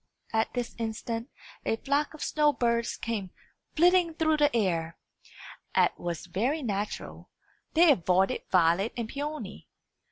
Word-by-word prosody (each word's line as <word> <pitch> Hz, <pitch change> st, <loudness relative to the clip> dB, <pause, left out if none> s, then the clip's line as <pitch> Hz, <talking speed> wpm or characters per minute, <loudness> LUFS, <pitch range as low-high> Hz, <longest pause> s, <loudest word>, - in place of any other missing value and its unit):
At 220 Hz, 0 st, +1 dB
this 245 Hz, -1 st, -3 dB
instant 230 Hz, +2 st, -3 dB, 0.3 s
a -, -, +1 dB
flock 285 Hz, +6 st, -1 dB
of 310 Hz, -, -6 dB
snow 300 Hz, -1 st, +2 dB
birds 235 Hz, -2 st, 0 dB
came 215 Hz, -5 st, -3 dB, 0.5 s
flitting 345 Hz, 0 st, +4 dB
through 315 Hz, -1 st, +2 dB
the 290 Hz, -4 st, +3 dB
air. 170 Hz, -6 st, 0 dB, 0.8 s
As -, -, +4 dB
was 170 Hz, -2 st, -5 dB
very 240 Hz, -, -1 dB
natural, 205 Hz, -2 st, -4 dB, 0.5 s
they 335 Hz, 0 st, +7 dB
avoided 185 Hz, -, +2 dB
Violet 180 Hz, +4 st, +3 dB
and 235 Hz, -2 st, -2 dB
Peony. 295 Hz, +4 st, -6 dB
235 Hz, 130 wpm, -28 LUFS, 195-295 Hz, 0.8 s, they